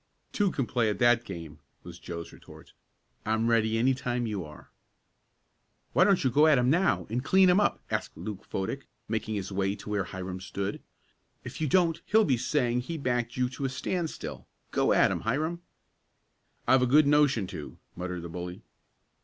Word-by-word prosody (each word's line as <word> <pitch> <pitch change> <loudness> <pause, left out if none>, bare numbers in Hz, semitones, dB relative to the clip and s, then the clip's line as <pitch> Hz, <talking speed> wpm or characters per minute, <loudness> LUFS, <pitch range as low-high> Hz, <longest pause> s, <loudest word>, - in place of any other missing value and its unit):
"Two 205 -2 +2
can 135 - -1
play 120 -2 +1
at 105 - -2
that 120 +1 +4
game," 80 -5 -8 0.2
was 90 0 -10
Joe's 85 -1 -7
retort. - - -15 0.5
"I'm 110 +1 0
ready 115 -1 +2
any 130 +4 +3
time 125 -1 -2
you 105 -5 -3
are." 75 -1 -13 1.2
"Why 185 - +5
don't 195 -5 +3
you 130 - +2
go 150 +5 +5
at 155 -3 +5
him 125 +1 +3
now, 150 - +2
and 125 +2 -1
clean 190 +3 +5
him 180 - +4
up?" 205 - +1
asked - - -3
Luke 105 -3 -6
Fodick, 115 +8 -4 0.2
making 110 0 -2
his 100 -1 -4
way 95 +1 0
to 105 - -10
where 105 -2 0
Hiram 95 0 -6
stood. 100 +2 -4 0.6
"If - - -8
you 155 - +1
don't 165 +1 +2
he'll 220 0 +4
be 135 - +3
saying 125 0 0
he 160 +7 -4
backed 120 -4 -1
you 125 0 +2
to 135 +2 -5
a - - 0
standstill. 160 +6 -4 0.2
Go - - +2
at - - +4
him, - - -1
Hiram." 155 +9 -1 1.1
"I've 130 0 +5
a 125 - +3
good 150 +4 +6
notion 145 -7 +3
to," 75 - -8 0.2
muttered 90 -1 -5
the 85 - -6
bully. 90 +4 -7
120 Hz, 185 wpm, -28 LUFS, 100-145 Hz, 1.2 s, good